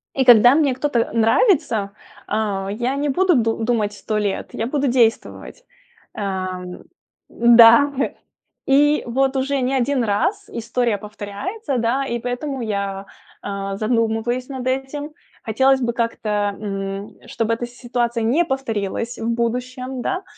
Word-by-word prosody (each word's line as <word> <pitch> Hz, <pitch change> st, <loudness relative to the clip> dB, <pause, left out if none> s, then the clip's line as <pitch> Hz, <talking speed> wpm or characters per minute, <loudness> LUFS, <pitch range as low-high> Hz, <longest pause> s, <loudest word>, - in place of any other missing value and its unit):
И 265 Hz, -, +1 dB
когда 245 Hz, 0 st, +8 dB
мне 290 Hz, -4 st, +2 dB
кто-то 255 Hz, -4 st, 0 dB
нравится, 230 Hz, -, +2 dB, 0.4 s
а, 200 Hz, -2 st, -2 dB
я 240 Hz, +5 st, -2 dB
не 290 Hz, +1 st, -1 dB
буду 360 Hz, +5 st, +3 dB
ду 225 Hz, -2 st, 0 dB
думать 220 Hz, -3 st, 0 dB
100 215 Hz, +1 st, -3 dB
лет, 205 Hz, -2 st, -2 dB
я 225 Hz, -, -2 dB
буду 280 Hz, +1 st, 0 dB
действовать. 245 Hz, -, 0 dB, 0.5 s
Ам. 185 Hz, -2 st, -5 dB, 0.5 s
Да, 235 Hz, +4 st, +7 dB, 0.7 s
и 290 Hz, +2 st, +3 dB
вот 265 Hz, +3 st, 0 dB
уже 270 Hz, +1 st, 0 dB
не 255 Hz, +2 st, 0 dB
1 260 Hz, 0 st, +1 dB
раз 370 Hz, -, -1 dB
история 235 Hz, -1 st, -1 dB
повторяется, 215 Hz, -, -5 dB
да, 235 Hz, +4 st, 0 dB
и 235 Hz, -, -2 dB
поэтому 250 Hz, +3 st, -4 dB
я, 200 Hz, -3 st, -3 dB, 0.4 s
а, 195 Hz, -1 st, -4 dB
задумываюсь 230 Hz, +2 st, 0 dB
над 260 Hz, -3 st, -6 dB
этим. 270 Hz, +3 st, -3 dB, 0.3 s
Хотелось 265 Hz, +4 st, +2 dB
бы 235 Hz, -1 st, 0 dB
как-то, 210 Hz, -3 st, -1 dB
м, 195 Hz, 0 st, -5 dB
чтобы 230 Hz, 0 st, -1 dB
эта 240 Hz, +1 st, -3 dB
ситуация 240 Hz, -1 st, -2 dB
не 275 Hz, +10 st, +2 dB
повторилась 235 Hz, -, -3 dB
в 225 Hz, -, -2 dB
будущем, 250 Hz, +2 st, -3 dB
да. 370 Hz, +9 st, -2 dB
235 Hz, 135 wpm, -21 LUFS, 215-265 Hz, 0.7 s, когда